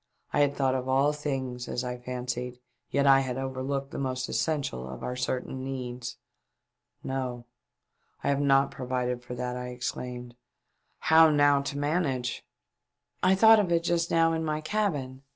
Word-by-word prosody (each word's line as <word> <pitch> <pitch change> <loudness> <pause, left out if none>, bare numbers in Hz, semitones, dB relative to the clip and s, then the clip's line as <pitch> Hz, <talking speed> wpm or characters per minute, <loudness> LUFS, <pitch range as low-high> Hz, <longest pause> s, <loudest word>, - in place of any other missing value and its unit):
I - - +2
had 145 -1 +3
thought 135 -2 +1
of 130 0 -2
all 135 +3 +3
things, 130 -4 -3
as 125 - -2
I 125 0 -4
fancied, 125 0 -4 0.3
yet 140 0 +1
I 135 -1 +7
had 130 -2 -2
overlooked 135 +1 -3
the - - -5
most 130 -1 -2
essential 135 - -1
of 65 - -8
our 125 - -3
certain 130 +1 -3
needs. 125 -2 -5 0.9
"No, 125 -2 -3 0.8
I - - +1
have 140 0 +2
not 135 -1 +4
provided 125 -1 -2
for 125 0 -7
that," 125 0 -3
I 125 0 -4
exclaimed. 125 0 -5 0.4
" - - -46
How 160 0 +8
now 145 -1 +4
to 140 0 -4
manage 145 -5 -1 0.3
?" - - -57
" - - -58
I 185 +1 +5
thought 220 +2 +7
of 190 -4 0
it 170 0 +2
just 170 0 +1
now 165 0 +3
in 160 0 -1
my 155 -1 -1
cabin. 155 -8 -2
130 Hz, 175 wpm, -28 LUFS, 125-145 Hz, 0.9 s, How